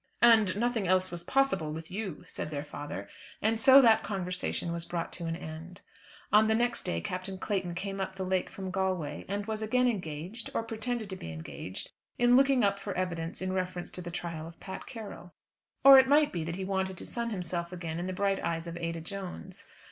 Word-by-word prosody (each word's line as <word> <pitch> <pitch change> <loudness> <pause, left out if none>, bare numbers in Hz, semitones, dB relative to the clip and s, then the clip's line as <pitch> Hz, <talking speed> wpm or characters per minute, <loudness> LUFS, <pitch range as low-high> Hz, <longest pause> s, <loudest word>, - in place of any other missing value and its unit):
"And 220 -6 +6
nothing 230 -3 0
else 185 0 +3
was 175 -1 -5
possible 195 - +1
with 160 +1 -7
you," 195 -4 -4
said - - -4
their 145 -2 -3
father. 145 -9 -6 0.3
And 220 +1 +1
so 270 +3 +9
that 225 -2 +6
conversation 180 -3 -2
was 170 0 -2
brought 170 0 -4
to 170 -1 -4
an 165 - -1
end. 165 +2 -8 0.5
On 215 +1 +7
the 220 - +3
next 240 +1 +2
day 85 0 -1
Captain 185 - -4
Clayton 185 -3 -2
came 195 +1 -3
up 190 0 -3
the 190 - -3
lake 185 0 0
from 190 -1 -6
Galway, 185 -6 -1
and 200 +1 -2
was 220 0 -3
again 250 +4 +2
engaged, 185 0 -3
or - - +1
pretended 225 0 -3
to - - -3
be 80 - -7
engaged, 80 +3 -7 0.3
in 245 0 +5
looking 270 -2 +5
up 200 0 +2
for 200 -1 -5
evidence 175 -1 -2
in 185 0 -1
reference 185 -1 -3
to 180 - -5
the 175 - -6
trial 170 -2 -4
of 165 0 -13
Pat 190 - -7
Carroll. 210 -8 -8 0.5
Or 270 0 +11
it 260 - +5
might 295 +2 +5
be 170 -3 -2
that 170 +1 -3
he 190 0 -4
wanted 190 -1 -1
to - - -6
sun 235 -1 -2
himself 175 -4 -3
again 170 -2 -4
in 175 - -3
the - - -2
bright 195 +1 +1
eyes 165 0 -1
of 170 0 -6
Ada 165 -1 -3
Jones. 190 +1 -7
185 Hz, 215 wpm, -30 LUFS, 170-220 Hz, 0.5 s, Or